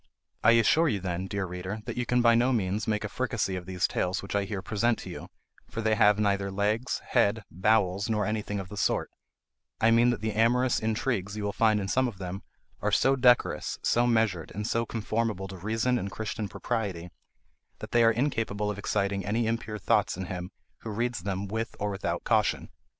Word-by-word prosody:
I 115 - +7
assure 115 +9 +4
you 105 - 0
then, 90 0 -3
dear 100 0 -2
reader, 90 +4 -5
that 120 - -4
you 125 -1 -2
can 125 0 +2
by 115 -1 +6
no 120 +3 +3
means 105 -2 -1
make 105 -1 0
a - - -2
fricassee 115 -4 -2
of 90 -1 -6
these 90 -1 0
tales 90 +2 -1
which 100 - -5
I 100 -1 +1
here 95 -2 -5
present 115 +3 +1
to - - -8
you, - - -8 0.4
for - - -6
they 110 0 +2
have 105 -1 +5
neither 100 -2 +1
legs, 105 +6 -1
head, 105 +2 +2
bowels, 100 +1 +1
nor 105 -1 +1
anything 105 -1 -2
of 95 -2 -7
the 105 - -8
sort; - - 0 0.7
I 115 - +4
mean 120 +1 +5
that 120 -4 -1
the 110 -1 -1
amorous 120 +3 +3
intrigues 110 -2 -1
you 105 - -3
will 100 0 -2
find 110 -2 +3
in 95 - -3
some 130 +5 +2
of 110 -6 -6
them, 95 +1 -5 0.4
are - - 0
so 135 +1 +4
decorous, 125 -2 +3
so 120 +1 +3
measured, 110 -8 +1
and 105 +1 -3
so 115 +1 0
conformable 110 -3 -2
to 95 - -8
reason 115 +6 0
and 100 - -4
Christian 110 -1 -4
propriety, 95 -8 -3 0.7
that - - -9
they 120 -1 +4
are 115 - +6
incapable 115 -5 -1
of 105 - -6
exciting 100 -1 -1
any 110 +4 0
impure 110 -1 -2
thoughts 95 - +1
in 95 - -4
him 90 0 -5 0.3
who 115 - -7
reads 120 +1 -1
them 100 +1 -3
with 110 +3 -3
or 105 0 -1
without 95 - -3
caution. - - +1
105 Hz, 210 wpm, -28 LUFS, 100-115 Hz, 0.7 s, I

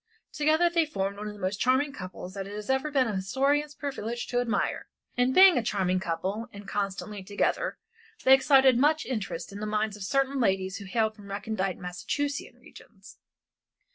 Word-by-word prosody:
Together 310 +3 +3
they 340 -1 +2
formed 200 -10 -3
one 210 +1 -6
of 210 - -5
the - - -13
most 190 +1 -2
charming 260 +3 +2
couples 185 -3 -8
that 195 -1 -5
it 205 - -7
has 210 +4 -3
ever 265 +3 0
been 275 -3 +2
the 210 -4 -2
historian's 280 +9 0
privilege 240 -5 -4
to 245 - -1
admire. 240 -3 -1 0.3
And 250 +1 +2
being 375 -6 +8
a - - -3
charming 185 -4 0
couple, 190 +6 -3
and 200 0 -11
constantly 200 0 -3
together, 205 - -1 0.5
they 260 - +7
excited 265 -2 +5
much 305 +3 +3
interest 200 -8 -4
in 200 - -8
the 215 - -3
minds 210 0 -1
of 210 - -12
certain 275 +5 0
ladies 190 -4 +1
who 200 - -9
hailed 220 +2 0
from 205 -2 -13
recondite 200 -1 -2
Massachusettsian 280 +11 -3
regions. - - -16
220 Hz, 185 wpm, -28 LUFS, 195-270 Hz, 0.5 s, being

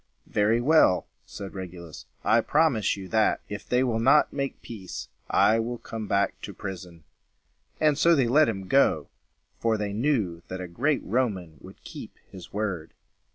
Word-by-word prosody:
"Very 105 +3 +2
well," 135 - +4 0.2
said 100 -1 -8
Regulus, 90 -4 -9 0.2
"I 115 +1 +4
promise 135 -10 +2
you, 95 -1 -7
that, 110 -1 +2
if 105 - -7
they 125 +1 +3
will 115 -3 0
not 135 +6 +4
make 140 -1 -3
peace, 100 -6 -8 0.2
I 110 +1 +4
will 120 +2 -3
come 110 -2 -7
back 100 0 0
to - - -8
prison." 90 -4 -8 0.8
And 155 -2 +3
so 170 0 +5
they 135 -5 +2
let 150 +4 +4
him 95 -4 -5
go; 90 - +3 0.5
for 115 -1 +1
they 105 -1 -3
knew 105 - 0
that 95 - -6
a 90 - -5
great 135 - 0
Roman 95 - -1
would - - -14
keep - - -10
his 90 -2 -11
word. 100 -6 -4
110 Hz, 165 wpm, -26 LUFS, 95-125 Hz, 0.8 s, so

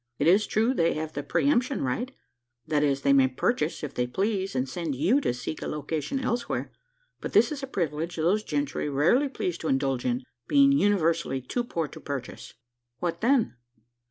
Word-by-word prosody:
It 145 - 0
is 195 +6 +5
true, 225 +4 +2
they 170 -9 +2
have 155 0 -4
the 145 - -3
pre 215 - 0
emption 260 -1 +2
right 225 - -1 0.6
that 155 -2 +1
is, 140 -1 +1
they 140 - +4
may 135 -1 +6
purchase, 150 - -1
if 145 -2 -4
they 125 0 -1
please, 195 - -1
and 130 +1 0
send 160 0 -3
you 190 - +3
to - - +1
seek 125 +5 -5
a - - -3
location 150 - -3
elsewhere; 240 -2 -2 0.5
but - - -6
this - - +5
is 290 -2 -4
a 270 - -4
privilege 165 - -2
those 180 +7 +1
gentry 145 -2 -2
rarely 175 - +3
please 180 -9 -3
to 160 - -4
indulge 135 -2 0
in 125 +1 -1 0.2
being 280 -1 +5
universally 170 - +2
too 185 - -2
poor 165 -9 -2
to - - -10
purchase." 140 -4 -6 0.4
"What 170 -1 -3
then?" 240 - +2
165 Hz, 190 wpm, -27 LUFS, 140-225 Hz, 0.6 s, may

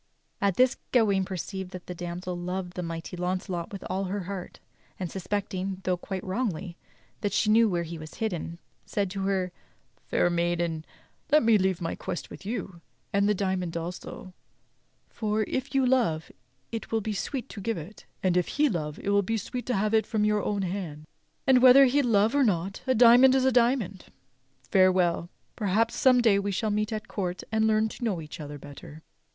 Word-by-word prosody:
At 200 -2 +2
this 255 +1 +4
Gawain 200 -6 +3
perceived 190 0 -5
that 185 -1 -8
the 180 - -6
damsel 175 +1 -5
loved 180 +1 -4
the 180 - -4
mighty 165 +1 -5
Launcelot 180 +1 -3
with 200 -2 -7
all 190 +2 -2
her 195 +2 -3
heart; 185 0 -7 0.4
and 180 -3 -4
suspecting, 190 -1 -3
though 185 0 +1
quite 185 +1 -5
wrongly, 185 -4 -2 0.4
that 205 -3 -2
she 215 - +2
knew 225 0 +5
where 175 -2 0
he 165 0 -7
was 155 0 -10
hidden, 175 -6 -3 0.3
said 200 -3 -2
to 195 0 -4
her: 190 -2 0 0.6
"Fair 175 - +2
maiden, 170 -2 -1 0.5
let 300 +1 +6
me 230 -1 +5
leave 190 -3 +1
my 165 - -2
quest 175 - -5
with 195 - -10
you; 195 -6 -4 0.3
and 200 +1 +3
the 210 - +3
diamond 185 -3 -1
also, 180 +2 -7 0.7
for, 215 -1 -1
if 260 +6 -3
you 270 -1 +4
love, 230 -12 +1 0.4
it 225 -1 -5
will 225 -1 +1
be 215 +1 -3
sweet 260 +6 -3
to 205 - -8
give 230 +3 -1
it, 170 +7 -10 0.2
and 185 -2 +2
if 180 -1 +2
he 295 +1 +2
love 150 - -3
it - - -4
will 200 0 +4
be 225 +3 -1
sweet 245 +3 -5
to 250 - +1
have 210 +2 0
it 220 0 +3
from 215 -2 +1
your 210 0 +2
own 205 -1 -1
hands, 175 -5 -4 0.4
and 260 -2 +5
whether 260 +2 +9
he 275 +3 +3
love 220 -3 +3
or 285 -1 +4
not, 195 -3 0
a 260 - +3
diamond 245 +3 +7
is 260 -1 +3
a 265 - +4
diamond. 235 -6 +1 0.7
Farewell; 185 -3 +3 0.3
perhaps 220 +2 +1
some 255 -2 +5
day 215 -4 +4
we 200 0 -2
shall 210 +2 -1
meet 210 +1 0
at 215 +1 -4
court, 185 -3 -3
and 220 0 +2
learn 220 0 +3
to 240 - -9
know 205 -7 0
each 155 0 -9
other 145 -1 -7
better." 145 +2 -11
195 Hz, 195 wpm, -27 LUFS, 180-220 Hz, 0.7 s, whether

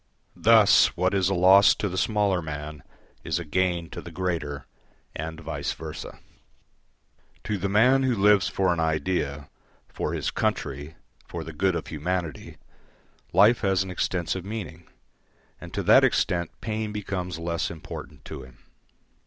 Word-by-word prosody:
Thus 110 -2 +6
what 90 +2 +1
is 95 -2 +2
a 95 - 0
loss 95 +3 +6
to 105 - -2
the 95 - -5
smaller 100 -2 +1
man 75 -1 -6 0.4
is - - -1
a 85 - -5
gain 85 +1 0
to - - -6
the - - -10
greater, 85 -6 -3 0.5
and 80 +1 -5
vice 80 - -4
versa. - - -8 1.3
To 105 -2 -2
the 100 +2 -1
man 125 +7 +4
who 130 -2 +1
lives 100 -2 +4
for 95 -2 +1
an 85 - -3
idea, 75 -2 -1 0.4
for - - -4
his - - -2
country, 70 +4 -2 0.3
for 85 -1 -6
the 80 - -8
good 95 +3 +1
of - - -3
humanity, 80 -1 -4 0.7
life 115 +3 +5
has 95 -2 +2
an 95 - -7
extensive 90 0 -2
meaning, 95 -5 -7 0.7
and - - -10
to - - -1
that - - +6
extent 85 -1 +1
pain 110 -1 -3
becomes 95 -4 -4
less 85 0 -2
important 80 -2 -9
to 75 -3 -7
him. 65 -1 -14
90 Hz, 155 wpm, -26 LUFS, 80-100 Hz, 1.3 s, Thus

